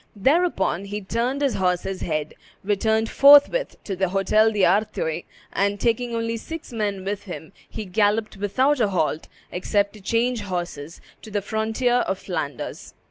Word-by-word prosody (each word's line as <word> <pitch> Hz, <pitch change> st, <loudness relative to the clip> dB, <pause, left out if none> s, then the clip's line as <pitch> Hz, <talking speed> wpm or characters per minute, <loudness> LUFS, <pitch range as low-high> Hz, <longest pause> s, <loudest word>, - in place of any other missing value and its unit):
Thereupon 235 Hz, -, +1 dB
he 205 Hz, +1 st, -4 dB
turned 240 Hz, +8 st, -1 dB
his 275 Hz, -, +2 dB
horse's 185 Hz, +1 st, -1 dB
head, 155 Hz, -2 st, -2 dB, 0.3 s
returned 220 Hz, +2 st, +1 dB
forthwith 290 Hz, -, +6 dB
to 195 Hz, -, -4 dB
the 190 Hz, 0 st, 0 dB
Hotel 215 Hz, +4 st, +3 dB
d'Artois, 195 Hz, -4 st, +1 dB, 0.3 s
and, 200 Hz, +1 st, 0 dB
taking 235 Hz, +1 st, 0 dB
only 230 Hz, 0 st, -1 dB
six 320 Hz, +2 st, -8 dB
men 205 Hz, -4 st, -2 dB
with 200 Hz, 0 st, -3 dB
him, 175 Hz, -2 st, -8 dB, 0.2 s
he 220 Hz, -, -6 dB
galloped 210 Hz, +3 st, +1 dB
without 260 Hz, +8 st, +1 dB
a 215 Hz, -4 st, +2 dB
halt, 160 Hz, -4 st, -1 dB, 0.2 s
except 200 Hz, +3 st, 0 dB
to 215 Hz, -, -13 dB
change 230 Hz, +3 st, 0 dB
horses, 175 Hz, -5 st, -5 dB, 0.2 s
to 220 Hz, -, -11 dB
the 205 Hz, -1 st, -2 dB
frontier 220 Hz, +4 st, 0 dB
of 190 Hz, -, -1 dB
Flanders. 155 Hz, -7 st, -5 dB
205 Hz, 150 wpm, -23 LUFS, 190-230 Hz, 0.3 s, forthwith